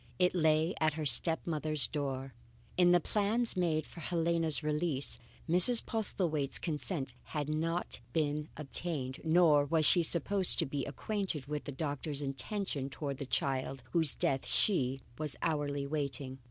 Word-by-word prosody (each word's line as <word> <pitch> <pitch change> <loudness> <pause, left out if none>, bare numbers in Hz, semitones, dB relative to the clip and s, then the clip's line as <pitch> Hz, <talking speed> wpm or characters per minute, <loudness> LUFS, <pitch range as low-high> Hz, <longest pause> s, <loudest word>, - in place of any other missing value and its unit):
It 180 0 +2
lay 160 0 +2
at 155 -1 +2
her 155 0 -4
step 160 +5 +5
mother's 155 -3 +1
door. 135 -3 -4 0.4
In 175 -1 +4
the 175 - +5
plans 215 +6 +2
made 160 -4 0
for - - -13
Helena's 165 -2 -1
release, 150 -2 -1 0.3
Mrs. 180 +8 +5
Postlethwaite's 170 - +1
consent 150 -4 -3
had 150 -2 -4
not 165 +2 -2
been 150 +1 -1
obtained 140 -3 -4
nor 160 -3 +4
was 155 +2 +1
she 175 - +6
supposed 180 +4 +3
to 165 - +1
be 140 -1 -4
acquainted 185 - -3
with 150 +1 -5
the - - -5
doctor's 145 0 -3
intentions 140 0 -3
towards 140 -1 -5
the 140 - -5
child 135 -1 -2
whose 160 -2 +4
death 135 -1 -1
she 135 -9 +1 0.2
was 150 -2 -2
hourly 145 -3 -1
awaiting. 140 -2 -4
155 Hz, 150 wpm, -32 LUFS, 140-170 Hz, 0.4 s, she